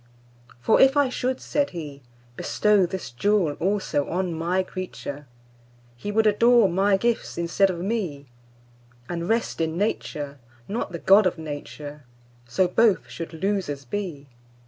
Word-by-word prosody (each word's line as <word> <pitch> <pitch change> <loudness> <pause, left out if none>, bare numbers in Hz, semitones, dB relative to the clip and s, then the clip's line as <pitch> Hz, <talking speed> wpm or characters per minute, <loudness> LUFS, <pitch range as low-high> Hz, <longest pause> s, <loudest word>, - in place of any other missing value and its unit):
For 120 - +3
if 270 +2 +6
I 285 -2 +4
should 255 +1 -2
(said 285 -1 0
He)Bestow 140 - -1
this 190 -8 -5
jewel 185 - +1
also 190 -6 0
on 180 0 -1
My 175 +3 0
creature, 165 -6 -7 0.7
He 165 +13 -5
would 220 +1 +2
adore 230 +1 +5
My 195 +2 +2
gifts 235 +3 -1
instead 170 +3 +2
of 180 - -3
Me, 180 -9 -2 0.8
And 170 0 -4
rest 225 -6 0
in 160 0 -1
Nature, 145 -8 -2 0.3
not 220 0 -3
the 170 - -4
God 195 +4 +5
of 180 - -2
Nature:So 145 -3 -5
both 215 +3 +2
should 165 -2 -6
losers 165 -5 -2
be. 160 -3 -5
180 Hz, 135 wpm, -24 LUFS, 145-205 Hz, 0.8 s, if